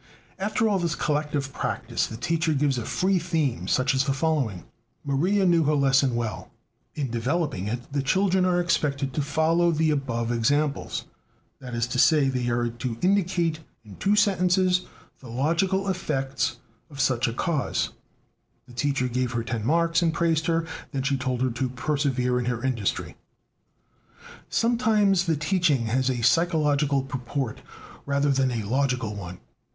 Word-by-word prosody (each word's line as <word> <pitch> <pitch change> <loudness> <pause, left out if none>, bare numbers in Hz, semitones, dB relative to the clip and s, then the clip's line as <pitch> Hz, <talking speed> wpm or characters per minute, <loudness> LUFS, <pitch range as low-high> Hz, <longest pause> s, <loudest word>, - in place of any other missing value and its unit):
"After 215 +3 +1
all 200 -3 +1
this 170 -3 -1
collective 150 -2 -1
practise - - -2
the 110 - -7
teacher 165 +5 0
gives 135 -2 +1
a 115 - -5
free 190 0 +1
theme 160 -7 -1
such 130 +2 +2
as 130 0 +1
the 135 - +1
following: 135 - -1 0.4
'Maria 180 +9 +1
knew 170 -3 +4
her 150 +1 +2
lesson 135 -2 +3
well.' 115 -2 -4 0.5
In 135 -5 -3
developing 120 - -1
it, 120 +4 -5
the 140 - +1
children 190 +6 +2
are 180 -1 +2
expected 140 -5 0
to 150 - 0
follow 160 +4 +2
the 160 -1 +2
above 120 -5 -1
examples: 140 +5 0 0.5
that 125 -2 -7
is 115 0 +1
to 125 +1 -3
say, 150 -3 +5
they 125 -2 -1
are 120 0 0
to 120 0 -5
indicate 180 -4 +1 0.3
in 100 -3 -12
two 200 +2 +2
sentences 185 -3 +2 0.3
the 125 - -12
logical 170 +10 0
effects 135 -9 -1 0.3
of 140 -3 -11
such 130 -1 +2
a 115 - -2
cause 150 +1 -1 0.8
(the 125 - -15
teacher 130 +1 0
gave 125 0 -1
her 115 -1 -1
ten 115 -2 -3
marks 165 +5 +2
and 165 -1 +1
praised 165 -2 +1
her; 165 0 +1 0.3
then 135 -1 -1
she 140 0 +1
told 130 -1 -1
her 130 - +1
to 125 +2 -2
persevere 130 -2 0
in 125 - -2
her 120 -1 -2
industry)." 120 -7 -2 1.3
Sometimes 215 -6 +2
the 160 -2 +2
teaching 150 -5 +1
has 130 +4 +1
a 120 -3 -2
psychological 150 -1 +2
purport 130 -2 -4 0.5
rather 140 0 +2
than 135 -1 +2
a 115 -3 -2
logical 125 -1 0
one. 90 -3 -7
140 Hz, 160 wpm, -25 LUFS, 125-170 Hz, 1.3 s, say